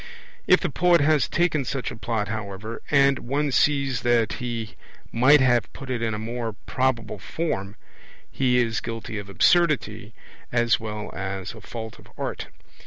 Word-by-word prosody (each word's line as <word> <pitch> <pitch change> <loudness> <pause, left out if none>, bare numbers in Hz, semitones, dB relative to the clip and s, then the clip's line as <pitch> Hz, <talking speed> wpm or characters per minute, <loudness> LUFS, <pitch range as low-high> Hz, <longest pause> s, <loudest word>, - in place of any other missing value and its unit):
If - - +6
the - - -1
poet 175 0 +4
has 150 -1 +3
taken 165 -4 +1
such 130 -1 -3
a - - -7
Plot, 110 -2 -2
however, 110 +1 -5
and 140 -1 +4
one 145 +3 -1
sees 140 -3 +2
that 120 -2 +2
he 115 -3 -4 0.4
might 135 +5 +6
have 120 -3 +2
put 135 -1 -7
it 120 -2 -2
in 110 -2 -1
a - - -4
more 115 +1 -4
probable 130 -3 -1
form, 100 - -3 0.6
he 125 -2 +2
is 115 -3 +1
guilty 115 -2 -5
of 100 -1 -9
absurdity 115 - +2 0.4
as 120 -1 +3
well 105 -2 -5
as 95 +1 -4
a 110 - -12
fault 110 +1 -8
of - - -16
art. - - -4
120 Hz, 165 wpm, -24 LUFS, 110-135 Hz, 0.6 s, If